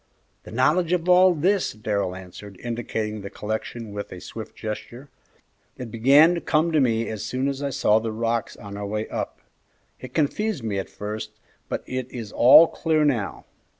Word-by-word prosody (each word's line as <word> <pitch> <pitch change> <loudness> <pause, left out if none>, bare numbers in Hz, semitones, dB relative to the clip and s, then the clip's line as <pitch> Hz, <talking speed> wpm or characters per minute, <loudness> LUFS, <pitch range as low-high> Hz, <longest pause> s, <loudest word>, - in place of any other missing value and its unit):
"The - - -10
knowledge 160 +8 +2
of 175 -1 0
all 180 0 +6
this," 185 +5 +1
Darrell 105 -4 -2
answered, 95 +2 -11
indicating 110 -3 -3
the 100 - -7
collection 110 +1 -5
with 100 0 -6
a 90 - -8
swift 110 +4 -9
gesture; 120 +5 -7 0.7
"it 125 -3 -7
began 140 +9 +6
to 170 - -3
come 160 +2 +1
to 155 - +3
me 115 -3 +1
as 110 -2 -5
soon 130 +2 -1
as 140 0 -3
I 140 - -1
saw 115 -5 +3
the 110 0 -3
rocks 115 0 -2
on 100 -1 -9
our 100 0 -4
way 105 +1 -3
up; - - -5 0.6
it 130 -1 -10
confused 165 - 0
me 105 -3 -1
at 95 - -5
first, 110 +1 -6 0.4
but - - -3
it 130 -1 -4
is 115 -4 -7
all 130 +7 +8
clear 155 -2 +1
now. 120 -9 -1
115 Hz, 185 wpm, -24 LUFS, 105-145 Hz, 0.7 s, all